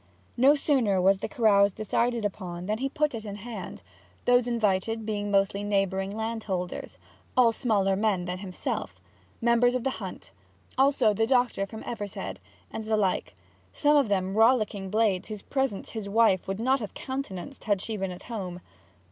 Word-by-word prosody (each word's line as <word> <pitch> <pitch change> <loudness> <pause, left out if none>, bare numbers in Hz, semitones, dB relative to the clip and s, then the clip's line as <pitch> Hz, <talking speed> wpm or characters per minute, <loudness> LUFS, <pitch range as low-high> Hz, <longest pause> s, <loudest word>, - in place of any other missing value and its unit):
No 270 +4 +6
sooner 255 -10 +2
was 190 +1 +4
the - - -3
carouse 205 -7 +4
decided 230 +3 0
upon 180 -3 -4
than 215 +3 -1
he 270 +1 -1
put 300 0 0
it 225 -2 -5
in 205 -2 -6
hand; 225 +3 -8 0.4
those 245 0 +4
invited 225 -1 0
being 205 -1 -2
mostly 200 0 +2
neighbouring 195 0 0
landholders, 220 -5 -4 0.4
all 240 -2 +6
smaller 205 -5 +1
men 200 -3 +1
than 180 +1 -4
himself, 185 -2 -4 0.4
members 240 +1 +4
of 250 - -1
the 270 - 0
hunt; 185 - -8 0.4
also 265 -5 +4
the 225 +2 +1
doctor 245 -6 +2
from 220 +2 -9
Evershead, 205 -4 -5 0.3
and 220 - -5
the 220 0 +1
like 190 - 0 0.4
some 295 0 +3
of 280 -4 +4
them 190 -1 0
rollicking 215 -3 +3
blades 210 -3 +1
whose 210 -2 -7
presence 265 -7 -2
his 215 -3 -5
wife 215 -3 +3
would 195 +1 -3
not 260 +4 +2
have 210 -5 -7
countenanced 265 -3 -6
had 205 -3 +2
she 220 +3 -4
been 195 -2 -2
at 180 0 -8
home. 185 -6 -5
215 Hz, 170 wpm, -27 LUFS, 195-240 Hz, 0.4 s, No